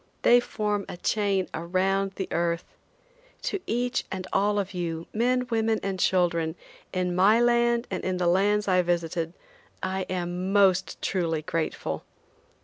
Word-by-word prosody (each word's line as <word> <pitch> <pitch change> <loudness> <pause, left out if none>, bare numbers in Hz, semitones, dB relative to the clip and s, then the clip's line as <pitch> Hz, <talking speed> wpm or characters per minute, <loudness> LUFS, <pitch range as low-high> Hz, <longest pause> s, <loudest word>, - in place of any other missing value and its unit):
They 245 - +7
form 210 -4 -2
a - - -6
chain 195 -1 0
around 190 +3 0
the 190 - -3
earth. 170 0 0 0.8
To - - -1
each 245 +2 0
and 185 -1 -4
all 205 +1 +2
of 200 -1 -2
you, 170 -2 -3
men, 250 +3 +1
women 225 -1 +1
and 195 -1 -2
children, 170 -3 +2 0.4
in 180 -1 -1
my 200 +5 +5
land 235 0 +3
and 185 - -3
in 185 -1 -1
the 180 - 0
lands 205 +4 +3
I 185 -1 +4
visited, 170 -1 -1 0.5
I 190 0 -2
am 180 +1 -2
most 190 -2 +3
truly 165 -4 0
grateful. 165 -1 -3
190 Hz, 145 wpm, -26 LUFS, 175-210 Hz, 0.8 s, They